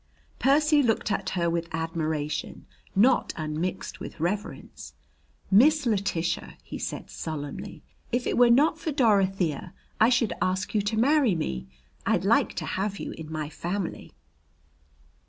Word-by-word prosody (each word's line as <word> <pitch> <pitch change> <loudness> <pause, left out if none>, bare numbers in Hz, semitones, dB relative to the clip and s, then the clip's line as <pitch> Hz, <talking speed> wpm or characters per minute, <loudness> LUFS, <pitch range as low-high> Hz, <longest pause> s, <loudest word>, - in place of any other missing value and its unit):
Percy 300 +2 +4
looked 225 -4 +1
at 195 -1 -1
her 170 -1 +1
with 170 0 -1
admiration 160 -2 -3 0.3
not 245 +6 +4
unmixed 155 +3 -3
with - - -8
reverence. 200 +6 -4 0.6
"Miss 290 +8 +5
Letitia," 195 -6 -1
he - - -7
said - - -5
solemnly, 145 -3 -6 0.3
"if 245 +1 0
it - - 0
were 245 -1 +6
not 295 +6 +4
for 315 - -2
Dorothea, 195 - +1 0.2
I 220 - +6
should 235 -3 +2
ask 185 +1 -1
you 210 - +2
to 205 +2 -2
marry 265 - +4
me. 65 - -3 0.4
I'd - - +1
like - - +3
to - - -3
have 200 +1 -2
you - - -5
in 160 -1 -9
my 155 -2 -3
family." 175 +4 -4
195 Hz, 140 wpm, -27 LUFS, 165-240 Hz, 0.6 s, were